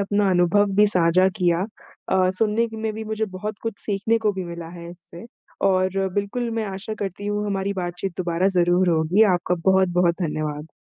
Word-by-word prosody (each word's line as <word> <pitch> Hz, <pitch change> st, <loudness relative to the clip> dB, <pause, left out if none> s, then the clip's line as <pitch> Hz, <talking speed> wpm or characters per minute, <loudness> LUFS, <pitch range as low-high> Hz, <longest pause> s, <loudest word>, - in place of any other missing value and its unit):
अपना 205 Hz, 0 st, +1 dB
अनुभव 185 Hz, +3 st, +3 dB
भी 210 Hz, 0 st, +6 dB
साझा 185 Hz, -1 st, +4 dB
किया। 175 Hz, 0 st, +2 dB, 0.4 s
अ, 185 Hz, -1 st, +3 dB
सुनने 225 Hz, +1 st, +2 dB
के 220 Hz, -, -9 dB
में 220 Hz, -1 st, -1 dB
भी 220 Hz, 0 st, -6 dB
मुझे 220 Hz, 0 st, -2 dB
बहुत 210 Hz, +1 st, -5 dB
कुछ 225 Hz, -3 st, -4 dB
सीखने 210 Hz, +3 st, 0 dB
को 210 Hz, -, +3 dB
भी 190 Hz, -1 st, -5 dB
मिला 170 Hz, -1 st, -7 dB
है 170 Hz, 0 st, -9 dB
इससे, 175 Hz, +2 st, -12 dB, 0.4 s
और 190 Hz, 0 st, +1 dB
बिल्कुल 220 Hz, +4 st, -2 dB
मैं -, -, -2 dB
आशा 215 Hz, +3 st, -5 dB
करती 195 Hz, +1 st, -5 dB
हूँ 205 Hz, 0 st, -1 dB
हमारी 200 Hz, 0 st, -1 dB
बातचीत 175 Hz, +1 st, -4 dB
दोबारा 175 Hz, +1 st, +1 dB
ज़रूर 175 Hz, +1 st, +3 dB
होगी। 165 Hz, +6 st, +3 dB
आपका 180 Hz, 0 st, -1 dB
बहुत-बहुत 180 Hz, -2 st, +3 dB
धन्यवाद। 150 Hz, -1 st, -3 dB
190 Hz, 185 wpm, -23 LUFS, 175-205 Hz, 0.4 s, भी